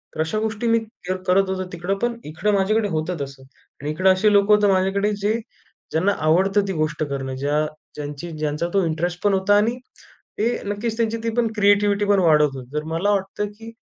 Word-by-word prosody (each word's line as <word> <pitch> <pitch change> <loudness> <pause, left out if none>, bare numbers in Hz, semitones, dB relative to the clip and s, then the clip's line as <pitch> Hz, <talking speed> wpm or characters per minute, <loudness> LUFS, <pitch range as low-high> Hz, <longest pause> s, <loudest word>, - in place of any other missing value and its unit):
तर - - -9
अशा 160 +7 -1
गोष्टी 220 +1 -2
मी 230 0 +4 0.3
क 185 - -1 0.2
करत 190 +1 +3
होतो 185 0 -2
तिकडं, 175 +3 -2
पण 240 0 -1
इकडं 160 +8 -1
माझ्याकडे 205 +2 +2
होतं 160 +1 -2
तसं. 135 -1 -7 0.4
आणि 145 - -3
इकडं 185 +5 +3
असे 205 +3 +3
लोकं 200 +1 +5
होतं 210 0 +3
माझ्याकडे, 195 +2 +1
जे 205 +2 +2 0.6
ज्यांना 185 +6 +2
आवडतं 195 +5 +3
ती 195 - -2
गोष्ट 155 0 -1
करणं 135 -1 -4
ज्या 145 +3 0 0.3
ज्यांची 150 +3 -6
ज्यांचा 150 +2 -1
तो 195 - +3
इंटरेस्ट 175 +2 -2
पण 205 - +3
होता, 195 +1 +3
आणि 225 +4 +1 0.6
ते 225 +3 +2 0.2
नक्कीच. 210 +3 -3
त्यांची 230 -1 0
ती 230 - 0
पण 235 - +3
क्रिएटिव्हिटी 205 0 +3
पण 200 -1 +3
वाढत 150 -4 +4
होती. 130 +1 -10
तर 150 - -1
मला 195 +5 +1
वाटतं 195 +1 -1
की 225 +1 -10
190 Hz, 200 wpm, -22 LUFS, 160-205 Hz, 0.6 s, लोकं